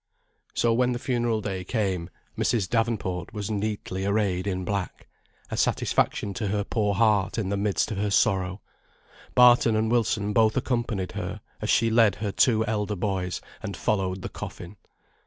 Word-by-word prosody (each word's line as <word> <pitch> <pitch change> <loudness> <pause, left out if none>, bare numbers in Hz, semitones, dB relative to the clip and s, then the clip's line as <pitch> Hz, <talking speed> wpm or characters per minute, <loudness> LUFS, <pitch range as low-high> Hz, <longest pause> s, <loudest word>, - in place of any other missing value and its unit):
So 115 -1 +3
when 125 +1 +2
the - - -2
funeral 120 -3 0
day 95 -3 -4
came, 95 -5 -1 0.3
Mrs. 105 -6 +1
Davenport 110 -6 -1
was 105 -1 -4
neatly 100 -2 -3
arrayed 100 -2 0
in 95 -2 -2
black, 100 -1 -4 0.4
a - - -1
satisfaction 100 - +1
to 105 +2 -3
her 100 +1 0
poor 105 -2 0
heart 105 -2 +2
in 105 -4 -1
the 100 - 0
midst 100 -2 0
of 105 - -3
her 105 0 0
sorrow. 95 -1 +1 0.7
Barton 120 -2 +6
and 110 +1 +1
Wilson 110 -3 +1
both 110 +1 +3
accompanied 120 -7 -1
her, - - -5 0.2
as - - -3
she 115 -1 +3
led 110 -3 +4
her 105 -1 -3
two 110 +1 +3
elder 105 -1 -1
boys, 95 -1 -2 0.2
and - - -5
followed 95 -2 -1
the - - -4
coffin. 90 +3 -8
105 Hz, 165 wpm, -26 LUFS, 95-115 Hz, 0.7 s, Barton